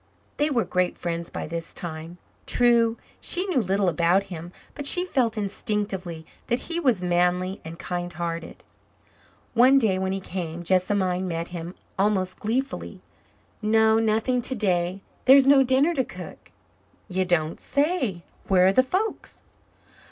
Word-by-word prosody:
They 295 Hz, +1 st, +1 dB
were 245 Hz, -6 st, +1 dB
great 180 Hz, -1 st, 0 dB
friends 170 Hz, -1 st, -4 dB
by -, -, -5 dB
this 165 Hz, +1 st, -6 dB
time. 165 Hz, 0 st, -6 dB, 0.3 s
True, 235 Hz, -1 st, +3 dB, 0.2 s
she 365 Hz, +2 st, +1 dB
knew 350 Hz, -10 st, +1 dB
little 195 Hz, -1 st, 0 dB
about 175 Hz, +3 st, +2 dB
him 170 Hz, +1 st, -8 dB, 0.2 s
but 290 Hz, -1 st, -2 dB
she 360 Hz, +4 st, +5 dB
felt 245 Hz, -10 st, 0 dB
instinctively 195 Hz, -5 st, -3 dB, 0.2 s
that 240 Hz, -, 0 dB
he 335 Hz, 0 st, -3 dB
was 245 Hz, -, +1 dB
manly 180 Hz, +2 st, +1 dB
and 160 Hz, +1 st, -8 dB
kind 175 Hz, 0 st, -4 dB
hearted. 170 Hz, 0 st, -5 dB, 0.9 s
One 255 Hz, +3 st, +6 dB
day 210 Hz, -8 st, +2 dB
when 190 Hz, 0 st, -1 dB
he 195 Hz, -, -2 dB
came 175 Hz, -3 st, -5 dB
Jessamine 185 Hz, 0 st, +1 dB
met 165 Hz, -1 st, -3 dB
him 175 Hz, 0 st, -7 dB, 0.2 s
almost 190 Hz, -2 st, 0 dB
gleefully. 250 Hz, +6 st, -3 dB, 0.6 s
"No, 220 Hz, +1 st, +4 dB
nothing 225 Hz, +3 st, +1 dB
today. 190 Hz, -6 st, +1 dB, 0.2 s
There 265 Hz, +2 st, +9 dB
is 275 Hz, -, +5 dB
no 275 Hz, 0 st, +6 dB
dinner 265 Hz, +6 st, +3 dB
to 270 Hz, -5 st, +1 dB
cook." -, -, -11 dB, 0.6 s
"You 185 Hz, -1 st, 0 dB
don't 165 Hz, -3 st, 0 dB
say. 280 Hz, -, -1 dB, 0.2 s
Where 185 Hz, -2 st, +4 dB
are 190 Hz, -, +4 dB
the 255 Hz, -, +6 dB
folks?" 375 Hz, +12 st, -3 dB
195 Hz, 150 wpm, -25 LUFS, 175-245 Hz, 0.9 s, There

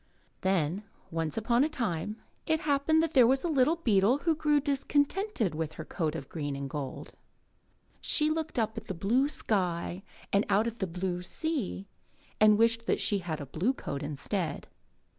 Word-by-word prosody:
Then, 190 Hz, 0 st, 0 dB, 0.3 s
once 165 Hz, 0 st, -2 dB
upon 235 Hz, +3 st, +3 dB
a 305 Hz, -, +1 dB
time, 210 Hz, -, -2 dB, 0.3 s
it 315 Hz, -1 st, +2 dB
happened 300 Hz, +2 st, +2 dB
that 325 Hz, -, -1 dB
there 250 Hz, -4 st, +7 dB
was 265 Hz, +2 st, +2 dB
a -, -, 0 dB
little 300 Hz, 0 st, +3 dB
beetle 225 Hz, -, +3 dB
who 320 Hz, +3 st, +1 dB
grew 300 Hz, -1 st, +2 dB
discontented 285 Hz, -, 0 dB
with 160 Hz, 0 st, -3 dB
her 160 Hz, -, -7 dB
coat 160 Hz, -3 st, -2 dB
of 140 Hz, -5 st, -6 dB
green 145 Hz, -3 st, -4 dB
and 140 Hz, 0 st, -4 dB
gold. 135 Hz, -2 st, -6 dB, 0.9 s
She 305 Hz, 0 st, +3 dB
looked 315 Hz, -2 st, -3 dB
up 220 Hz, -1 st, 0 dB
at 220 Hz, -, -19 dB
the 190 Hz, -, -4 dB
blue 235 Hz, -, +2 dB
sky 180 Hz, -, -1 dB, 0.3 s
and 200 Hz, +1 st, +4 dB
out 210 Hz, +3 st, +3 dB
at 235 Hz, 0 st, -4 dB
the 190 Hz, -, -1 dB
blue 180 Hz, +1 st, -3 dB
sea 225 Hz, -, -3 dB, 0.5 s
and 215 Hz, -1 st, +6 dB
wished 230 Hz, +1 st, +2 dB
that -, -, +2 dB
she 200 Hz, 0 st, +2 dB
had 165 Hz, -4 st, -4 dB
a 145 Hz, -, -5 dB
blue 175 Hz, -, 0 dB
coat 140 Hz, -, -5 dB
instead. 150 Hz, +3 st, -3 dB
210 Hz, 180 wpm, -29 LUFS, 170-280 Hz, 0.9 s, there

